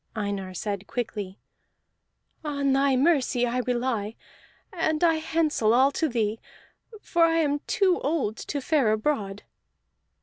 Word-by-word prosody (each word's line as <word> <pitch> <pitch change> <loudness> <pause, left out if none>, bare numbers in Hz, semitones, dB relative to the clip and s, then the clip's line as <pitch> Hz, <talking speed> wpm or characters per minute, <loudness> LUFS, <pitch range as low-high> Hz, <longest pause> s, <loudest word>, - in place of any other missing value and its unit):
Einar 200 -3 -3
said 200 +1 -4
quickly: 210 -5 -4 1.1
"On 280 -2 0
thy 270 0 +3
mercy 260 -4 +2
I 245 +1 -1
rely, 240 -4 -1 0.6
and 315 -2 0
I 325 -2 +4
handsel 310 -8 +1
all 265 +3 +5
to 320 +2 -1
thee, 225 -2 -1 0.6
for 340 - +2
I 330 0 +2
am 290 -3 +1
too 380 -4 +2
old 280 -7 -1
to 285 - -4
fare 270 -6 +2
abroad." 215 -4 -2
260 Hz, 130 wpm, -26 LUFS, 215-305 Hz, 1.1 s, all